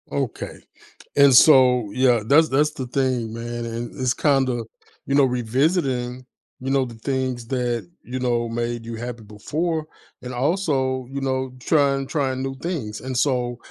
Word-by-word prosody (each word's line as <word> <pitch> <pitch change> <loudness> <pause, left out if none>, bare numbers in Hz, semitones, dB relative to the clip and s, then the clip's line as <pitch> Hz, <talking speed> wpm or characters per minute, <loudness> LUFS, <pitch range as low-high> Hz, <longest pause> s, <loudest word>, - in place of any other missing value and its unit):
Okay, 135 -5 -4 0.6
and 140 -1 +6
so 125 -5 +6
Yeah, 125 -2 +3
that's 155 +7 +5
that's 150 +3 +2
the 130 -4 -6
thing, 125 -3 -1
man 120 0 -5
and 115 +1 -5
it's 130 -1 +1
kinda, 130 -6 +1 0.4
you 140 - 0
know, 140 -1 +6
revisiting, 125 0 0 0.3
you 130 +1 -3
know, 135 -1 +2
the 120 -2 -9
things 130 0 -3
that, 120 -6 -2
you 130 +1 -5
know, 120 -2 0
made 120 0 -3
you 115 0 -5
happy 120 0 -6
before, 155 +10 -3 0.4
and 125 0 -7
also, 130 -3 0
you 140 0 -4
know, 130 -1 -1
trying 140 -1 +2
trying 130 -4 -1
new 135 0 -3
things, 135 -8 -4
and 130 -1 -4
so, 125 -2 0
130 Hz, 160 wpm, -23 LUFS, 120-135 Hz, 0.6 s, and